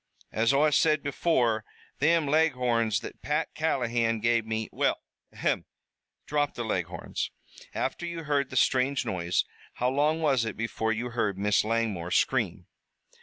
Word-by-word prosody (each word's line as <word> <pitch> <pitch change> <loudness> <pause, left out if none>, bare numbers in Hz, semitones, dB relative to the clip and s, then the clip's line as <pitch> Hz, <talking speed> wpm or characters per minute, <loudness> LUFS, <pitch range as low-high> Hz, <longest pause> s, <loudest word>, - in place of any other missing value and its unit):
As 115 +1 +2
Oi 150 +2 +4
said 155 0 +3
before, 125 -7 +1 0.4
thim 165 +2 +3
Leghorns 125 -8 +2
that - - -9
Pat 150 +2 -1
Callahan 120 -7 0
gave 115 0 +1
me 110 0 -2
" - - -44
"We'll - - +1 0.4
ahem! - - -1 0.6
drop 145 -1 0
the 120 - -3
Leghorns. 90 -5 -3 0.5
After 155 +6 -2
you 170 -1 -5
heard 145 -2 0
the - - -8
strange 130 +1 +2
noise 85 -1 0 0.3
how 125 +1 0
long 150 +4 +2
was 140 -7 +2
it 110 -2 -4
before 110 0 -1
you 120 +2 -2
heard 105 -5 -1
Miss 105 +1 +2
Langmore 110 -6 -1
scream?" - - +1
120 Hz, 150 wpm, -28 LUFS, 110-145 Hz, 0.6 s, Oi